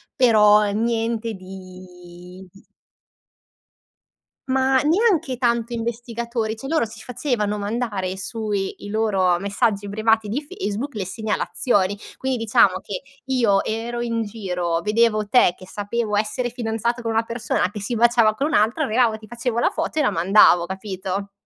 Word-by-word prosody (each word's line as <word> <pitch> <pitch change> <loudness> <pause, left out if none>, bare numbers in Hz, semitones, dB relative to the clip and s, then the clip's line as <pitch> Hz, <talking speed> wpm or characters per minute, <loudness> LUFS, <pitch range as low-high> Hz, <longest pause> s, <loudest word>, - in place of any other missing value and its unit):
però 210 -4 +5
niente 225 +1 -1
di 185 -1 -12 2.0
Ma 265 0 +2
neanche 330 - +2
tanto 235 -1 0
investigatori, 235 -1 -3
cioè 270 +5 -8
loro 310 -5 +1
si 220 +1 -11
facevano 220 -4 -2
mandare 205 -3 -3
sui 205 -1 -3
i 205 - -7
loro 195 -5 +2
messaggi 200 +1 0
privati 220 +1 +1
di 250 +8 -2
Facebook 285 - -5
le 200 -3 -3
segnalazioni. 205 0 0 0.2
Quindi 265 -2 -2
diciamo 215 -4 +3
che 195 -3 -6 0.2
io 235 -7 +2
ero 235 +2 -3
in 230 -1 -1
giro, 180 -6 -3
vedevo 215 +1 +2
te 205 -5 +4
che 185 - -14
sapevo 210 +2 -2
essere 230 +4 -1
fidanzato 235 0 -2
con 230 - -1
una 225 +1 +1
persona 230 -5 -1
che 210 - -7
si 220 +4 -3
baciava 235 -1 +4
con 275 +7 -1
un - - -3
altra, 225 +9 +2
arrivava, 225 -1 +2
ti 215 0 -14
facevo 235 +1 -2
la - - +3
foto 315 -1 -3
e - - +4
la 280 - +3
mandavo, 175 0 +5
capito? 190 +1 -5
220 Hz, 145 wpm, -22 LUFS, 200-240 Hz, 2.0 s, però